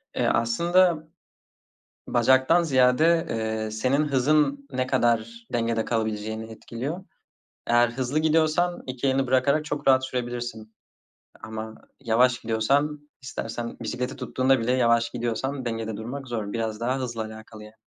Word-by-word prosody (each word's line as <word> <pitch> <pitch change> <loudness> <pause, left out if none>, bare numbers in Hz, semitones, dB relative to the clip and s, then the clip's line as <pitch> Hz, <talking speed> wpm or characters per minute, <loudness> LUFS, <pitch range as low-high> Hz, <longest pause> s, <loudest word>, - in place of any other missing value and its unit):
Eee, - - +1
aslında 170 +7 +2 1.0
bacaktan 130 +8 +4
ziyade, 155 +4 +3
eee, 110 -1 -2
senin 130 +7 +1
hızın 140 +1 +2
ne 130 0 -1
kadar 115 -2 0
dengede 115 -1 0
kalabileceğini 110 -1 -3
etkiliyor. 140 - -6 0.6
Eğer 120 0 +4
hızlı 130 +4 -1
gidiyorsan 160 +2 +2
2 130 +1 -2
elini 135 0 +1
bırakarak 140 +4 +2
çok 145 -2 -4
rahat 130 0 +5
sürebilirsin. 120 -3 -5 0.7
Ama 110 0 -6 0.2
yavaş 125 0 +3
gidiyorsan 145 +7 0
istersen 115 -2 -5
bisikleti 125 +4 -3
tuttuğunda 130 0 +1
bile 115 +2 0
yavaş 115 -2 +3
gidiyorsan 125 +3 -3
dengede 115 -2 -3
durmak 130 +5 -6
zor. 110 -4 -4
Biraz 110 -2 -2
daha 125 +2 0
hızla 115 -3 -3
alakalı 110 0 -10
yani. 105 +1 -13
125 Hz, 130 wpm, -25 LUFS, 115-140 Hz, 1.0 s, rahat